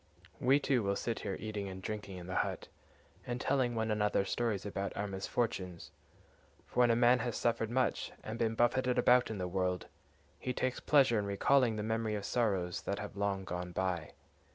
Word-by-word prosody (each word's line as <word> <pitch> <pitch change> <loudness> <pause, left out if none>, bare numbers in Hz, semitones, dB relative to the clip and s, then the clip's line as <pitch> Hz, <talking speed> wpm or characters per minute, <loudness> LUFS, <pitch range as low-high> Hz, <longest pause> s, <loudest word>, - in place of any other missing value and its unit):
We 135 +3 +4
too 135 -4 +2
will 100 -1 0
sit 115 +2 -2
here 95 - -3
eating 105 -2 -4
and 95 0 -7
drinking 100 -1 -5
in 90 - -8
the 90 0 -3
hut, - - -4 0.6
and 120 0 -2
telling 130 -3 +1
one 110 -1 0
another 105 -2 +1
stories 110 -3 -1
about 100 -1 -3
our 105 - -1
misfortunes; 95 -2 -3 0.7
for - - -4
when 120 -1 +6
a 115 - +4
man 120 +1 +5
has 120 -1 -2
suffered 115 -2 0
much, 130 +1 0
and 110 +1 -5
been 115 -1 +1
buffeted 125 +2 +2
about 125 0 +5
in 110 - -4
the 90 -1 -2
world, 90 0 -1 0.5
he 125 - -2
takes 130 0 -1
pleasure 135 -6 +4
in 100 - -2
recalling 120 +4 +3
the 105 - -3
memory 110 0 -1
of 100 -1 -4
sorrows 95 -8 0
that 100 - -2
have 105 -1 -6
long 100 -1 -1
gone 90 -1 -5
by. 90 -4 -2
110 Hz, 195 wpm, -33 LUFS, 95-120 Hz, 0.7 s, when